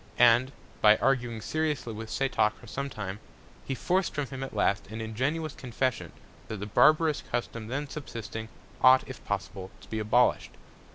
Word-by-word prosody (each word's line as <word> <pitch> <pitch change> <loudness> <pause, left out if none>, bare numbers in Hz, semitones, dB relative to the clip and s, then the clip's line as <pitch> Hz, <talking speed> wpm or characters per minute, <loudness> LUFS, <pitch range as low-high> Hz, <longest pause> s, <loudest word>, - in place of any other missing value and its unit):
And, 120 +2 +5 0.3
by 105 0 +7
arguing 120 -4 0
seriously 150 -4 -2
with 110 +1 -7
Setoc 130 -5 +1
for - - -14
some 140 +5 -4
Time, 100 -5 -5 0.5
he 135 - -1
forc'd 180 - 0
from 145 -1 -1
him 130 +1 -7
at 135 - -7
last, 100 -1 +1
an 110 +3 -7
ingenuous 135 +8 -2
Confession, 125 0 -2 0.4
that 110 - -5
the 100 - -5
barbarous 155 +8 +4
Custom 115 -2 -3
then 140 +5 -3
subsisting, 115 -6 -6 0.3
ought, 130 0 +7
if 130 - -9
possible, 100 -1 -4
to - - -16
be 110 - -3
abolish'd. 115 +4 +2
120 Hz, 165 wpm, -28 LUFS, 110-135 Hz, 0.5 s, by